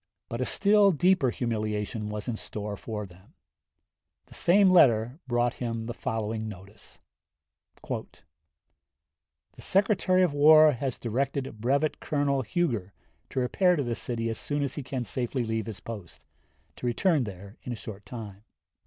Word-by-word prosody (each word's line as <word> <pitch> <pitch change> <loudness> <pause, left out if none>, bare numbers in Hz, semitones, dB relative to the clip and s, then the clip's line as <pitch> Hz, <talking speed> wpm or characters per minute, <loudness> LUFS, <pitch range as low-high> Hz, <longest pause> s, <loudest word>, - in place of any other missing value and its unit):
But 115 +2 -3
a - - +1
still 205 0 +4
deeper 180 -4 +3
humiliation 110 -2 -2
was 105 -1 -5
in 120 - -1
store 105 -1 -5
for 105 0 -5
them, 90 +1 -18 0.9
The - - -17
same 190 +2 +4
letter 125 -5 +4
brought 120 0 +1
him 115 -2 -2
the 120 - -4
following 110 -1 -3
notice: 100 +1 -12 0.9
"The - - -5 1.4
Secretary 190 -2 +2
of 175 -5 +1
War 155 +1 +7
has 130 -1 -3
directed 130 -1 -2
Brevet 140 +6 +1
Colonel 140 -2 0
Huger 115 - -1 0.4
to - - -2
repair 180 +9 +3
to 145 - 0
this 120 -2 -3
city 115 -2 -2
as 115 - -4
soon 145 0 -2
as 135 -2 -2
he 145 - -4
can 130 -1 -4
safely 120 +4 -2
leave 110 0 -2
his 110 -3 -6
post, 105 -7 -9 0.5
to 125 - -3
return 145 +3 +2
there 100 +1 -9
in 125 - -6
a - - -2
short 100 -1 -9
time. 105 -4 -9
120 Hz, 155 wpm, -28 LUFS, 110-145 Hz, 1.4 s, War